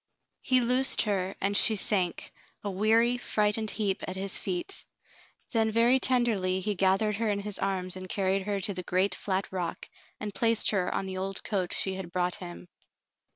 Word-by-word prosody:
He 255 -1 +3
loosed 250 +2 +4
her 195 -3 -2
and 200 +1 0
she 220 +2 +6
sank, 190 -3 0 0.3
a 205 - -3
weary, 225 +5 +2
frightened 215 -1 0
heap, 200 -3 -1
at 185 - -4
his 195 +1 -2
feet. 360 +2 -2 0.7
Then 225 -2 +1
very 235 +4 +4
tenderly 220 -8 +2
he 210 +3 -1
gathered 195 +2 +1
her 225 0 -1
in 200 -1 -1
his 205 0 -2
arms 185 -2 -2
and 185 0 -7
carried 195 0 0
her 200 -1 -1
to 200 +2 -1
the 180 - -5
great 185 +2 +1
flat 190 -1 -2
rock 180 -3 -4 0.3
and 210 -1 -5
placed 230 0 +3
her 190 -4 0
on - - -2
the 190 0 -5
old 195 +1 -4
coat 190 -4 -2
she 190 - -1
had 190 -2 -7
brought 180 0 0
him. 175 0 -9
200 Hz, 185 wpm, -28 LUFS, 185-220 Hz, 0.7 s, she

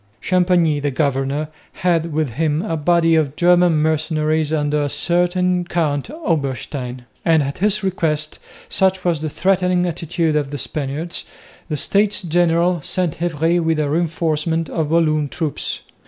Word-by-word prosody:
Champagney, 175 -2 +2
the 145 0 -1
governor, 140 +2 -1 0.2
had 170 -2 0
with 155 -3 -1
him 155 +5 0
a 165 -6 -2
body 165 +1 +3
of 155 -3 +1
German 175 0 +4
mercenaries 155 0 0
under 150 -1 0
a 145 - -1
certain 180 +2 +1
Count 160 -3 -1
Oberstein; 140 - -3 0.2
and 160 -3 +3
at 140 0 -5
his 210 +1 +1
request, 155 -5 -1 0.3
such 190 -1 +1
was 170 -4 +1
the 155 - -2
threatening 180 +1 +1
attitude 170 -2 -1
of 145 -2 0
the 145 - -5
Spaniards, 150 +5 -4 0.4
the 150 - -1
States 205 +5 +1
General 175 0 +2
sent 175 -1 -2
Havré 170 0 +1
with 160 -1 +1
a 145 -2 0
reinforcement 165 0 -1
of 160 -3 -1
Walloon 155 -3 +2
troops. 155 -1 -3
160 Hz, 145 wpm, -19 LUFS, 150-175 Hz, 0.4 s, German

